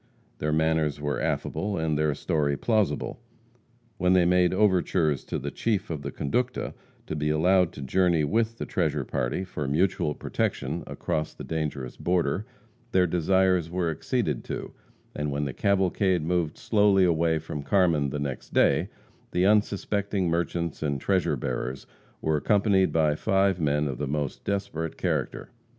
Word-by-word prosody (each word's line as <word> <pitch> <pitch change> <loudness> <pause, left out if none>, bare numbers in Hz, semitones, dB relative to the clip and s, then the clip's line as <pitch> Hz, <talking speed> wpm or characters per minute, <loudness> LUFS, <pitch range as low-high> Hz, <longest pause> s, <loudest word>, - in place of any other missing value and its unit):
Their 75 - 0
manners 80 -2 +1
were 75 0 -2
affable, 100 -1 -1
and 80 -1 0
their 75 -1 +1
story 75 -3 0
plausible. 110 -4 0 0.8
When 90 +1 +3
they 90 -2 +5
made 90 0 +4
overtures 90 - +2
to - - -3
the - - -4
chief 105 -4 -1
of 75 -3 -4
the - - -5
conducta, 125 - -2 0.3
to 80 - -4
be 75 0 -1
allowed 90 +3 +3
to 70 - -7
journey 85 +2 +2
with 115 +8 0
the - - -4
treasure - - -1
party - - -2
for 80 -6 -4
mutual 75 0 +1
protection - - -2
across 75 0 -3
the - - -8
dangerous 75 -5 -4
border, 90 +4 0 0.4
their 95 -3 +4
desires 90 0 +2
were 90 -1 -1
acceded 80 - -1
to, - - -5 0.4
and 75 0 -2
when 70 +1 -1
the 70 - -4
cavalcade 95 -2 +1
moved 85 -2 -1
slowly 100 -3 +3
away 85 -2 +2
from 75 -2 -5
Carmen 80 -4 +2
the 70 - -3
next 70 -2 -5
day, - - +3 0.4
the 90 +1 +1
unsuspecting 100 -1 +1
merchants 85 -1 -2
and 70 -3 -1
treasure 95 +4 +1
bearers 65 +1 -4 0.4
were 80 -1 +2
accompanied 100 +2 +3
by 80 -2 +3
five 95 +2 +1
men 75 0 +1
of 65 -2 -4
the 75 - -2
most 75 -1 -3
desperate 95 -5 -3
character. - - -2
85 Hz, 155 wpm, -26 LUFS, 75-95 Hz, 0.8 s, they